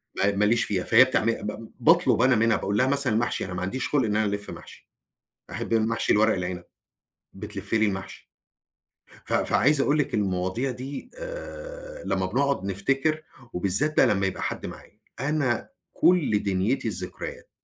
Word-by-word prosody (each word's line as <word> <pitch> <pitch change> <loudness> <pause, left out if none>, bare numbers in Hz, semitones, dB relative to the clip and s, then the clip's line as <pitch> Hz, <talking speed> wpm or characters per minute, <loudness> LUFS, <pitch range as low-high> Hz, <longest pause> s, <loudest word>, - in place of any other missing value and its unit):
ما 100 +1 +1
ما 105 - +2
ليش 115 +2 +3
فيها 95 -3 -1
فهي - - +7
بتعمل 115 -3 0
ب 105 +2 -6
باطلب - - +4
أنا 130 0 +5
منها 115 +1 +3
باقول 100 +1 -2
لها 130 +3 +3
مثلًا 140 -4 +1
محشي، 120 +2 0
أنا 95 - -6
ما 90 - -4
عنديش 110 +8 -2
خُلْق 145 -3 +2
إن 105 -1 -1
أنا 110 0 +2
ألف 100 0 -2
محشي. - - -12 0.6
أحب - - -3
المحشي 115 +1 +1
الورق 110 0 +4
العنب، 90 -1 -4 0.7
بتلف - - -5
لي 110 -1 +4
المحشي. 95 -2 -5 0.9
ف - - -4
فعايز 145 +1 +3
أقول 145 +2 +2
لِك 150 - -1
المواضيع 95 +5 -1
دي 130 +3 -7
آآ - - -8
لمّا - - 0
بنقعد 140 -6 0
نفتكر 135 +11 0 0.3
وبالذات 100 +12 0
بقى - - +6
لمّا 95 -1 +1
يبقى 95 - -4
حد - - -3
معايا. - - -11 0.2
أنا 135 -3 0 0.2
كل 155 - +3
دنيتي 100 +6 0
الذكريات، 90 -3 -6
115 Hz, 165 wpm, -26 LUFS, 100-140 Hz, 0.9 s, فهي